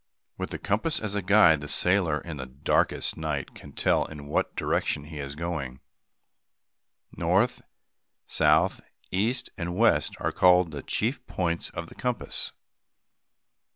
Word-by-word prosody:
With - - -4
the - - -4
compass 110 +11 0
as 105 -2 -3
a 105 - 0
guide, 90 -5 +5
the 75 - -6
sailor, 85 -2 +2
in 85 -3 -7
the 65 -1 -6
darkest 65 +2 0
night, 75 -3 -3
can 70 - -12
tell - - +2
in 75 -2 -9
what 75 - -1
direction 75 - 0
he 75 0 -9
is 70 0 -5
going. 75 -6 -4 1.4
North, - - +1 0.6
south, - - +3 0.3
east, 110 +7 0
and 85 0 -3
west 115 +4 +3
are - - -1
called 90 -2 +4
the 70 -2 -6
chief - - -1
points 85 -2 -2
of 85 - -6
the - - -13
compass. 125 -2 -3
85 Hz, 145 wpm, -27 LUFS, 75-95 Hz, 1.4 s, guide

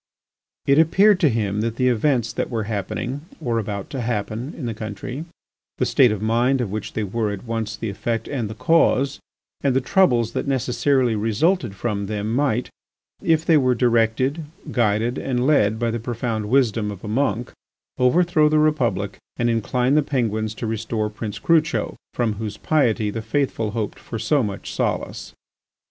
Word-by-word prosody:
It 140 +2 +4
appeared 190 +5 +5
to 160 -6 +4
him 105 -3 -1
that 115 0 -2
the 125 +1 +1
events 120 -1 +1
that - - -2
were 115 -3 -2
happening 110 +6 -3 0.2
or 120 -7 -1
about 100 -2 -5
to 135 - -3
happen 115 +3 -3
in 135 - -5
the 115 - -2
country, 110 +7 -6 0.5
the - - +1
state 125 -4 +4
of 105 -1 -3
mind 120 +4 +2
of 115 -6 -2
which 105 0 -4
they 110 - -1
were 105 +2 -1
at 100 -2 -6
once 115 -2 -3
the 110 -1 -4
effect 115 +3 -3
and 120 -7 -3
the 110 - -7
cause, 140 -1 +2 0.4
and 135 -2 +1
the - - +5
troubles 125 - +2
that - - -3
necessarily 130 -1 +1
resulted 115 - +1
from 100 -1 -2
them 105 +1 -2
might—if 145 +4 -2
they 160 - +5
were 130 -3 +3
directed, 120 +5 +1 0.3
guided, 115 +1 +1
and 125 -2 -1
led 110 -8 +3
by 115 0 0
the 115 - -2
profound 115 -2 -3
wisdom 115 -5 +2
of 100 -2 -8
a - - -6
monk—overthrow 135 - 0
the 155 - +3
Republic 125 -11 +1 0.2
and 120 0 +1
incline 125 +3 +1
the 150 - +5
Penguins 110 -6 -1
to 115 - -5
restore 110 -1 -2
Prince 105 -1 -5
Crucho, 160 -2 +1 0.2
from 115 -3 +1
whose 105 -2 -4
piety 115 -9 +1
the 115 - -4
faithful 120 -3 -1
hoped 110 -1 -4
for 115 - -6
so 145 +5 +2
much 100 -4 -4
solace. - - -2
115 Hz, 170 wpm, -22 LUFS, 110-135 Hz, 0.5 s, appeared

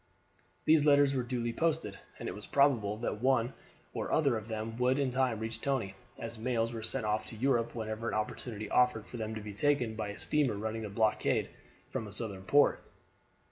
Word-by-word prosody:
These 155 -1 +6
letters 145 -1 +5
were 130 - +1
duly 120 -1 -2
posted, 160 -8 -1 0.2
and - - -6
it - - -3
was 105 - -9
probable 120 -8 +3
that 110 -2 -3
one 130 -2 +2 0.4
or - - -3
other 140 -6 +3
of 110 -1 -5
them 110 0 -4
would 125 +2 +3
in 140 -3 +1
time 130 -3 +1
reach 110 +1 -5
Tony, 130 -9 -1 0.2
as 115 0 -6
mails 115 -1 0
were 115 - -4
sent 115 +1 -1
off 105 0 0
to - - -7
Europe 120 -1 +1
whenever 110 0 -3
an - - -1
opportunity 110 0 -3
offered 125 -3 +3
for 120 - -8
them 110 -1 -3
to 110 - -5
be 105 0 -7
taken 125 -1 +1
by 110 - -3
a 100 - -6
steamer 145 -7 +1
running 110 +2 -3
the 105 - -4
blockade 110 +1 +1 0.4
from 110 - -3
a - - -9
Southern 100 -2 -3
port. 145 +7 +4
115 Hz, 205 wpm, -32 LUFS, 110-130 Hz, 0.4 s, These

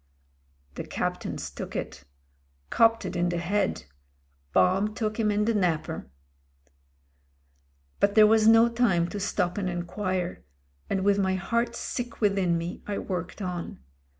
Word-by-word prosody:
"The - - -5
Captain's - - -4
took - - -7
it. - - -5 0.7
Copped 230 0 +4
it - - -4
in 175 0 +1
the 175 - -1
head. 190 +3 -1 0.7
Bomb 195 - +2
took 220 -1 -2
him 215 -2 +2
in 210 0 +1
the 230 - +2
napper." 170 - -1 1.9
But 200 0 +2
there 215 -1 +8
was 220 0 +4
no 225 +1 +7
time 230 -8 +2
to 205 - -5
stop 185 -1 -1
and 185 -2 -1
enquire, 180 +1 -3 0.5
and 190 -1 0
with 200 0 +3
my 190 -1 +1
heart 235 +5 -1
sick 245 -2 -5
within 195 -5 +2
me 170 +2 -5
I 205 -1 -2
worked 180 +2 -4
on. 180 -2 -4
200 Hz, 145 wpm, -27 LUFS, 175-215 Hz, 1.9 s, there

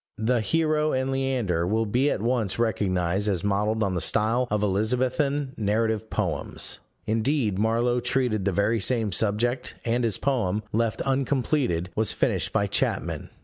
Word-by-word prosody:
The 115 +2 +1
Hero 155 +3 +1
and 130 +1 0
Leander 125 -11 0
will 110 +3 +1
be 125 +7 +1
at 105 - -2
once 115 -5 0
recognized 95 -4 0
as 95 -5 0
modelled 105 +2 0
on 95 -2 0
the 90 - -1
style 115 +8 +1
of 105 0 0
Elizabethan 130 +7 0
narrative 110 +1 0
poems: - - -2 0.3
indeed 110 -2 0
Marlow 120 +3 +1
treated 125 -4 0
the 100 - +1
very 105 +5 +1
same 110 0 +1
subject, 110 +6 0
and 120 +1 +1
his 110 -4 +2
poem, 110 -7 0
left 115 0 0
uncompleted, 130 - 0
was 110 -2 +1
finished - - 0
by 100 - +1
Chapman. 100 - -1
110 Hz, 150 wpm, -25 LUFS, 100-125 Hz, 0.3 s, his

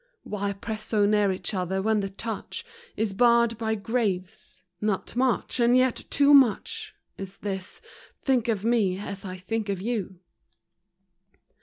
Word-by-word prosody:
Why 200 -1 -3
press 215 +2 -6
so 210 -2 +2
near 205 -1 +3
each 185 - -4
other, 190 0 -1
when 215 +2 +2
the 195 -1 -2
touch 220 +2 -6 0.3
Is 215 -2 0
barred 235 +1 +4
by 220 -1 0
graves? 205 -4 -3 0.2
Not 210 0 -2
much, 255 0 0
and 240 +1 +5
yet 255 -1 +1
too 285 0 +5
much, 285 - +3 0.2
Is 195 0 -7
this 190 -2 -5 0.2
" - - -25
Think 255 -4 +2
of 215 -3 -1
me 215 -6 +2
as 200 0 -6
I 185 -1 -6
think 210 +3 -3
of 195 -2 -1
you." 200 -4 -3
215 Hz, 155 wpm, -26 LUFS, 195-235 Hz, 0.3 s, and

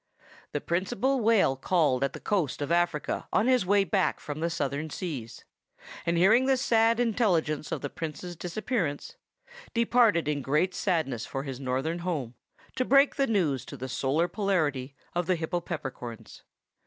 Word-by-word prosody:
The 145 - -1
Principal 195 +10 0
Whale 220 - +3
called 135 -2 +1
at 140 - 0
the - - -7
coast 185 -10 -1
of 145 - -4
Africa 170 -3 0
on 215 - +2
his 255 -7 +3
way 200 +1 +4
back 185 - 0
from 145 0 -6
the 165 +1 0
Southern 150 -1 -2
seas, 140 -9 -6 0.6
and 170 0 +2
hearing 220 +9 +5
the 265 -1 +4
sad 230 -2 +3
intelligence 185 - +1
of - - -2
the 145 - -3
Prince's 165 +2 -6
disappearance, 180 - -3 0.6
departed 230 -8 +3
in 150 -1 0
great 150 +8 +1
sadness 160 - -1
for 135 - -4
his 135 -3 -6
Northern 135 +6 -2
home, 155 -9 -3 0.4
to 255 - +2
break 275 +2 +5
the 275 - +1
news 165 - +1
to 140 - -9
the 130 +1 -5
Solar 140 +6 0
Polarity 155 -9 -1 0.2
of 175 -1 -1
the 185 - +2
Hypopeppercorns. 155 -8 -5
170 Hz, 160 wpm, -28 LUFS, 145-205 Hz, 0.6 s, hearing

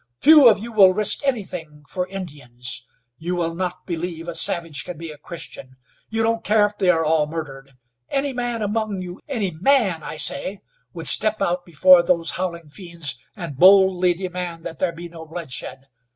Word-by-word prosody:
Few 300 -4 +8
of 215 - +3
you 230 +3 -7
will 190 -4 +6
risk 215 +6 +4
anything 180 - -4
for 180 -1 -3
Indians. 130 -10 -6 0.3
You 175 +3 -3
will 165 -1 -2
not 180 +1 -4
believe 170 -1 -5
a 170 - -4
savage 165 -2 -1
can 180 - -8
be 165 0 -7
a 150 - -12
Christian. 145 -5 -9 0.3
You 225 0 0
don't 225 0 0
care 210 -1 +3
if 205 0 -6
they 185 - +2
are 165 -2 +3
all 155 -1 +2
murdered. 140 -4 -7 0.4
Any 275 0 -1
man 240 -2 -3
among 210 -2 -2
you 180 0 -9
any 220 -10 -2
man, 195 - +2
I 155 - -7
say 165 +5 +1 0.3
would 165 -2 -8
step 215 +7 +3
out 180 -2 -1
before 175 +2 +6
those 170 -1 0
howling 170 -3 -4
fiends 170 -4 -4 0.2
and 165 -6 -7
boldly 185 -1 +5
demand 180 -2 -6
that 165 - -7
there 185 - 0
be 170 +1 -9
no 165 -1 -11
bloodshed. 145 -4 -7
175 Hz, 180 wpm, -22 LUFS, 160-200 Hz, 0.4 s, Few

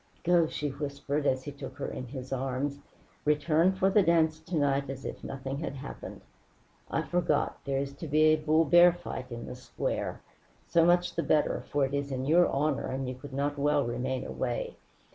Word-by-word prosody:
"Go," 175 -2 +4
she 150 -1 -3
whispered, 140 +1 -3
as 130 0 +1
he 145 - -6
took 135 -2 -9
her - - -3
in 125 - -6
his 130 +1 -6
arms. 135 +2 -2 0.4
"Return 155 +4 +3
for 190 0 +1
the 205 - +5
dance 160 -3 +3
to 165 +2 -6
night 140 -2 +1
as 135 -1 -6
if - - -6
nothing 135 +1 -5
had 155 -3 -4
happened 140 +1 -8 0.7
I - - 0
forgot, 175 -4 0
there 135 -1 0
is 140 0 -2
to 165 - -6
be 155 +2 +3
a 155 0 +6
bull 155 +1 +2
bear 175 +4 +7
fight 150 -7 -7
in 120 0 -6
the - - -6
square. 125 0 -4 0.5
So 170 -1 +4
much 175 0 +3
the 165 - 0
better, 155 -2 +1
for 145 -1 +2
it 135 - -5
is 140 0 -2
in 130 0 -2
your 170 +5 +5
honor, 145 +1 0
and 130 0 -3
you 130 - -3
could 135 +3 -11
not 145 +2 -2
well 145 -1 +2
remain 125 +2 -2
away. 120 -2 -3
145 Hz, 200 wpm, -29 LUFS, 135-160 Hz, 0.7 s, bear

